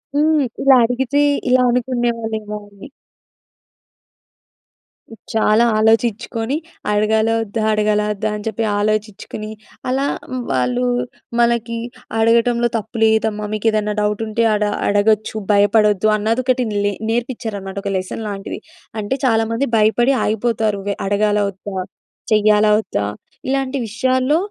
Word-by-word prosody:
హ్మ్. 300 0 +3 0.2
ఇలా 270 -1 +7
అడిగితే, 265 +4 0 0.3
ఇలా 255 0 +4
అనుకునేవాళ్ళేమో 230 -4 -1
అని. 200 +6 -13 2.5
చాలా 220 +1 +3
ఆలోచించుకొని 225 +3 +1 0.3
అడగాలా 220 +2 +2
ఒద్దా? 215 +1 -3
అడగాలా 210 0 +1
ఒద్దా? 215 +1 -2
అని 210 - -7
చెప్పి 225 +1 -2 0.2
ఆలోచించుకొని, 215 0 -3 0.4
అలా 270 +2 0 0.5
వాళ్ళు 125 -1 0 0.6
మనకి 235 -1 +1 0.4
అడగటంలో 235 +1 +3
తప్పు 220 +2 -7
లేదమ్మా. 220 -1 +2
మీకు 215 +1 -1
ఏదైనా 210 -1 0
డౌట్ 210 +1 0
ఉంటే 230 +2 0
అడ 210 0 +1 0.2
అడగొచ్చు. 210 +2 +2 0.2
భయపడొద్దు 205 0 +3
అన్నదొకటి 245 +4 0 0.2
లె 205 - +1 0.2
నేర్పించారన్నమాట 225 -5 -3
ఒక 200 - -2
లెసన్ 185 +4 -5
లాంటిది. 195 -1 -6 0.4
అంటే 205 +5 -2
చాలామంది 230 +2 +1
భయపడి 230 +5 +3
ఆగిపోతారు 220 -1 0
వే 200 - -1
అడగాలా 205 +1 +2
ఒద్దా? 195 0 -8 0.5
చెయ్యాలా 215 0 +4
ఒద్దా? 100 - -3 0.4
ఇలాంటి 270 0 -1
విషయాల్లో 255 +6 +1
220 Hz, 110 wpm, -19 LUFS, 210-235 Hz, 2.5 s, ఇలా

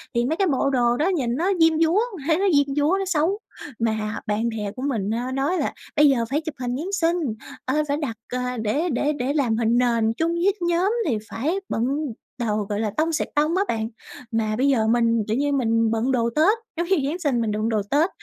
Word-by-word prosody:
thì 235 - +2
mấy 305 +5 0
cái 390 - +2
bộ 275 -2 +1
đồ 240 -2 +2
đó 310 - +1
nhìn 270 -11 0
nó 350 +8 +1
diêm 325 -1 +4
dúa, 330 +5 +4 0.3
thấy 320 -1 +3
nó 395 - +1
diêm 285 -1 +2
dúa, 295 +5 +3
nó 390 - -1
xấu. 365 +3 +1 0.4
Mà 220 -1 -1
bạn 215 +3 0
bè 210 -3 -4
của 255 - -7
mình 215 -7 -1
á 245 +3 -2
nói 275 +7 0
là - - -1 0.2
bây 295 -1 +6
giờ 235 -4 +2
phải 295 +3 0
chụp 315 -2 -6
hình 245 -1 -2
Giáng 345 +7 -4
sinh, 345 -3 +1 0.5
ờ, 260 - 0
phải 285 - 0
đặt, 275 -7 -3 0.2
ờ, 250 0 -2
để 285 +11 0
để 290 +2 0
để 255 +3 0
làm 250 -7 +1
hình 230 +1 +2
nền 230 -2 +2
chung 325 +7 0
với 360 +3 +2
nhóm 345 +3 +2 0.2
thì 235 -7 +1
phải 295 +10 -1
bận 225 - -1 0.6
đồ 210 - +1
gọi 205 0 -1
là 215 -2 -1
"tông 320 +1 +2
xẹt 315 - -1
tông" 305 +3 +2
á 390 - +3
bạn. 220 -1 -1 0.4
Mà 220 -1 0
bây 270 +3 +2
giờ 225 -5 +2
mình, 230 -1 +2
kiểu 220 +3 0
như, 285 +1 +1
mình 230 -4 +2
bận 230 +4 0
đồ 235 -2 +1
Tết 385 +9 +4 0.2
giống 340 +1 -1
như 325 -8 +2
Giáng 345 - -3
sinh 280 -8 +1
mình 220 -2 0
đựng 215 +2 -1
đồ 215 -2 +1
Tết 310 +6 +3
270 Hz, 240 wpm, -23 LUFS, 230-320 Hz, 0.6 s, bây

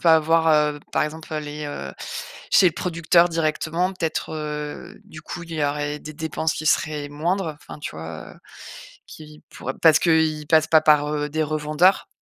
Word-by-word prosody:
enfin, 160 -2 +6
voir, 165 +1 +2 0.3
heu, 145 - -11
par - - +2
exemple, 155 +1 -8
heu - - -1
les, 150 0 -6
heu 145 - -6 0.6
chez - - +6
le 165 - -5
producteur 170 0 +2
directement 165 +2 0
peut-être, 165 -5 -3
heu, 150 -1 -5
du 155 - -11
coup, 175 - -7
il 165 - -10
y 155 -2 0
aurait 145 +1 -2
des 155 - -9
dépenses 160 +1 -2
qui - - -5
seraient 150 -2 +1
moindres, 165 +2 -2
enfin, - - -11
tu - - -5
vois, 80 0 -8
heu, - - -18 0.7
qui 150 -1 -13
pourraient 130 - -5
parce 160 -3 +6
qu'ils 160 -2 +2
passent 160 -1 +4
pas 160 -1 +5
par, 150 -1 +4
heu, 150 0 -2
des 155 +1 -1
revendeurs. 155 +4 +2
155 Hz, 185 wpm, -23 LUFS, 150-165 Hz, 0.7 s, enfin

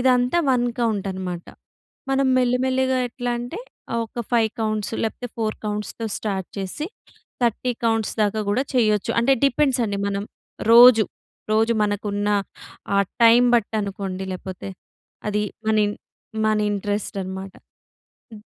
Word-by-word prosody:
ఇదంతా 250 +4 +3
1 245 -1 +2
కౌంటనమాట. 190 -5 -2 0.6
మనం 270 0 +2
మెల్లి 250 0 +2
మెల్లిగా 260 0 +1
ఎట్లా 245 0 -4
అంటే, 245 - -6 0.4
ఆహ్, 230 - +1
ఒక 235 +2 -5
5 225 -2 +3
కౌంట్స్, 215 -1 -1
లేపోతే 235 +2 -3
4 220 -1 -1
కౌంట్స్‌తో 210 +2 -3
స్టార్ట్ 195 -4 -3
చేసి, 195 - -4 0.6
30 240 +2 +1
కౌంట్స్ 225 -2 +1
దాకా 210 +1 0
గూడా 235 +6 +1
చెయ్యొచ్చు. 215 -4 +2
అంటే, 270 +3 +4
డిపెండ్సండి. 250 -7 +1
మనం 200 0 -2 0.5
రోజూ, 235 -2 +9 0.5
రోజూ 225 +2 +3
మనకున్నా 205 0 0 0.6
ఆహ్, 200 -1 +3 0.2
టైమ్ 235 +2 +7
బట్టనుకోండి, 200 -4 -2
లేపోతే 185 +1 -7 0.6
అదీ 210 0 0 0.2
మన 220 0 +2
ఇన్ 205 - -2 0.5
మన 215 0 +3 0.2
ఇంట్రస్టనమాట. 195 -2 -3 0.8
హ్మ్. 210 -1 -11
215 Hz, 125 wpm, -23 LUFS, 200-245 Hz, 0.8 s, రోజూ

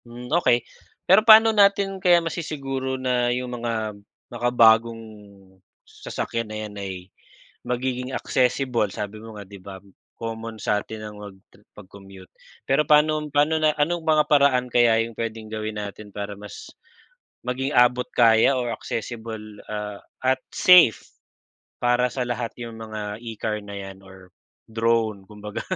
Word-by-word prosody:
Hmm, 120 +3 -8
okey. 125 -8 +3 0.4
Pero 190 +3 +6
paano 220 0 +8
natin 200 -2 +3
kaya 175 -1 +5
masissiguro 135 -5 -4
na 125 -2 0
yung 125 0 -3
mga 110 -2 -2 0.4
makabagong 115 -1 +3 0.8
sasakyan 115 -1 -5
na 110 - -6
yan 105 - -10
ay 95 -1 -5 0.7
magiging 125 0 -3
accessible. 125 -3 0
Sabi 105 +3 -6
mo 110 -1 -10
nga, 100 - -9
'di 100 +1 -13
ba, 95 0 -9 0.4
common 115 0 -6
satin 105 +1 -2
ang 105 -1 -9
magtre 100 0 -14
mag-commute. 95 -2 -14 0.3
Pero 140 +3 +2
paanom 150 +1 +3
paano, 155 +2 +2
na 155 -1 +3
anong 165 +3 0
mga 155 -1 +4
paraan 140 -4 +4
kaya 115 -2 +4
yung 115 - -10
puwedeng 110 -1 -5
gawin 110 -1 -4
natin 105 +1 -8
para 100 0 -5
mas 105 0 -10 0.8
maging 130 +2 -2
abot 125 0 +4
kaya 115 +2 +4
or 120 -2 -2
accessible, 115 -1 -6 0.3
ah, 105 -1 -5 0.2
at 130 0 +1
safe, 180 - +5 0.6
para 120 +1 +2
sa 125 +1 -3
lahat 120 -1 -3
yung 115 -1 -8
mga 110 -1 -6
e-car 110 -2 -4
na 100 0 -9
yan 95 -1 -9
or 95 -1 -16 0.4
drone 110 -3 0
kumbaga? 105 0 -7
115 Hz, 140 wpm, -23 LUFS, 105-130 Hz, 0.8 s, paano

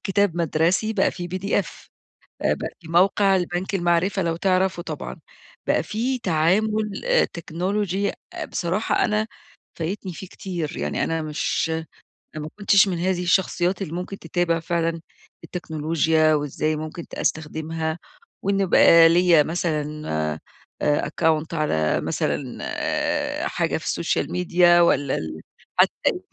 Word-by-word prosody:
كتاب 195 -2 +1
مَدرسي 170 +6 +1
بقى 200 -3 +2
في 175 -1 -6
PDF 185 +2 -2 0.6
بقى - - 0
في 170 - -14
موقع 195 +3 +4
البنك 180 +1 -2
المَعرِفة، 175 +2 +1
لو 165 -2 0
تعرفه 185 0 +1
طبعًا، - - -6 0.5
بقى - - +2
في 250 +4 -2
تعامل 210 - +1
آآ - - +4
تكنولوجي 190 +4 -2 0.4
بصراحة 185 +5 0
أنا 215 +1 0 0.5
فايتني 185 +3 -3
فيه 190 - -8
كتير، 175 -5 -5
يعني 75 0 -1
أنا 165 0 -1
مش 155 +1 -1 0.6
أنا 155 - -4
ما 155 - -6
كنتش 200 0 +5
من 180 -3 -1
هذه 180 0 0
الشخصيات 180 +1 +1
اللي 165 -5 -4
ممكن 180 +3 -5
تتابع 170 0 0
فعلًا 165 0 -1 0.4
التكنولوجيا، 160 -1 +1
وإزاي 150 +1 -1
ممكن 155 +2 -6
ت - - -22
أستخدمها، 160 +1 -2 0.4
وإن 195 0 +1
بقى 165 -2 +7
ليا 170 -2 +5
مثلًا 155 -2 -2 0.3
أ - - -11 0.4
أكّونت 155 +2 +1
على 80 - +1
مثلًا 130 -4 -2 0.8
حاجة 165 -2 -1
في 160 - -9
السوشيال 170 - -1
ميديا 175 -1 +4
والّا 145 -4 +2
ال 80 0 -5 0.4
حتى - - +5 0.2
إيميلي - - +2
175 Hz, 130 wpm, -23 LUFS, 160-190 Hz, 0.8 s, بقى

